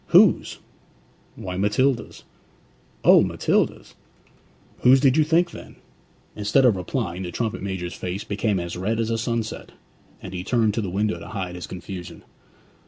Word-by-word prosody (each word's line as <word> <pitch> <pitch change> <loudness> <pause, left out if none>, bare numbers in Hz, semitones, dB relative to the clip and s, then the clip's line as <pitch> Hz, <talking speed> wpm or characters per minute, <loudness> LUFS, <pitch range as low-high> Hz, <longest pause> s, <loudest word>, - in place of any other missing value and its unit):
'Whose?' - - +5 0.8
'Why, 90 -1 -6
Matilda's.' 115 +5 0 0.8
'O, - - +7
Matilda's!' - - 0 0.9
'Whose 130 +2 +6
did 135 -1 +4
you 155 - +5
think 170 +3 +2
then?' - - -11 0.6
Instead 105 +6 +2
of 120 -5 +5
replying, 90 -1 -3
the 90 - -4
trumpet 110 +4 -3
major's 95 -3 -4
face 90 +3 -4
became 100 -1 -1
as 85 0 -5
red 105 +6 -1
as 115 0 0
sunset, 115 -1 -3 0.5
and 95 - -9
he 90 -1 -4
turned 110 -1 +1
to 115 - -1
the 100 - -3
window 105 +4 -1
to - - -10
hide 95 -4 -4
his 90 -1 -7
confusion. 90 -1 -8
105 Hz, 150 wpm, -23 LUFS, 90-115 Hz, 0.9 s, O